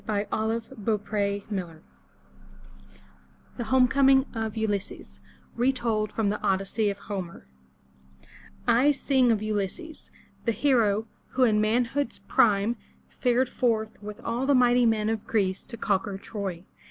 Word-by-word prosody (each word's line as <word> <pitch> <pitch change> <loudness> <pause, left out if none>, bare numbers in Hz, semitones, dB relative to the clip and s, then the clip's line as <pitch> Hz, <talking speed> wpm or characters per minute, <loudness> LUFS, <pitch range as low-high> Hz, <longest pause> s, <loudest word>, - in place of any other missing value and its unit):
422 220 +3 -2
FROM 215 - -11
THE 215 0 +2
TOWER 200 -1 -1
WINDOW 175 -5 -4 1.8
THE 240 - -2
HOME 255 +2 +4
COMING 270 +1 +4
OF 220 -2 -3
ULYSSES 205 -3 -3 0.4
Retold 235 -4 0
from 220 -3 0
the 210 - -2
Odyssey 200 +2 0
of 200 - -3
Homer 190 - -6 1.5
SING 265 -3 +2
of 215 -2 0
U 215 0 -1
lys'ses, 210 - -4 0.4
the 230 - +2
hero, 225 -4 +2 0.3
who 260 - +3
in 215 -3 +4
manhood's 235 +4 0
prime 210 +2 +2 0.3
fared 250 +1 +1
forth 225 -4 -1
with 210 0 -8
all 240 +3 -1
the 285 - +4
mighty 245 -1 +4
men 215 -1 +1
of 220 -1 -2
Greece 190 -4 0
to 230 - -8
conquer 200 -1 -1
Troy. 195 -4 -5
220 Hz, 135 wpm, -26 LUFS, 205-245 Hz, 1.8 s, HOME